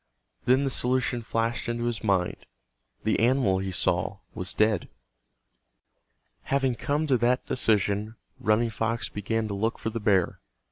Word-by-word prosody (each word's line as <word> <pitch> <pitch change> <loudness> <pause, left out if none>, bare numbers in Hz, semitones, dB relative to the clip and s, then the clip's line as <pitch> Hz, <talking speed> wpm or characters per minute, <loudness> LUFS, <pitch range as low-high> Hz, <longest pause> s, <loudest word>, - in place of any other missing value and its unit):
Then 130 +3 +4
the 135 - 0
solution 125 -1 0
flashed 115 +1 -1
into 120 0 -2
his 120 -3 -2
mind—the - - -2
animal 115 -5 +3
he 95 0 -3
saw 90 +2 0 0.2
was 95 0 -2
dead. 105 -3 +2 1.6
Having 135 -2 +1
come 150 +1 0
to 135 -4 +3
that 125 +2 +2
decision 105 -2 +1 0.2
Running 115 +2 +2
Fox 115 +2 -1
began 110 +2 -2
to 105 - -4
look 110 +4 -1
for 110 - -3
the 115 - -3
bear. 100 -5 +2
110 Hz, 140 wpm, -27 LUFS, 100-120 Hz, 1.6 s, Then